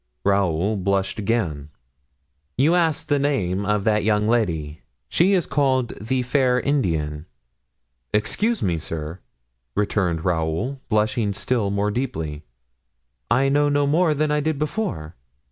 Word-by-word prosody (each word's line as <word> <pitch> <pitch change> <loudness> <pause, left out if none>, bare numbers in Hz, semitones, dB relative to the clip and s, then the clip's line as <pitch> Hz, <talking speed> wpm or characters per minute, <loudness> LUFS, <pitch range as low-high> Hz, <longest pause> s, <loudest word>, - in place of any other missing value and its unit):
Raoul 100 0 +1
blushed 100 +3 -1
again. 90 -10 -1 0.9
"You 145 +7 +4
asked 165 -2 +1
the 145 -1 +2
name 100 -9 0
of 105 -1 +1
that 105 0 +2
young 105 0 +2
lady. 80 -10 0 0.3
She 185 +4 +3
is 180 -4 +2
called 130 -4 +1
the 125 +4 -1
fair 125 0 +2
Indian." 80 - -1 0.8
"Excuse 210 - 0
me, 85 -3 0
sir," 80 +2 -5 0.6
returned 90 -6 0
Raoul, 90 - -1
blushing 110 0 +1
still 110 0 0
more 100 +1 0
deeply, 80 - -3 0.9
"I 130 +4 +3
know 145 +1 +3
no 145 0 +2
more 155 +2 +2
than 150 +1 0
I 150 - +2
did 155 0 -1
before. 145 - -3
110 Hz, 130 wpm, -23 LUFS, 90-140 Hz, 0.9 s, You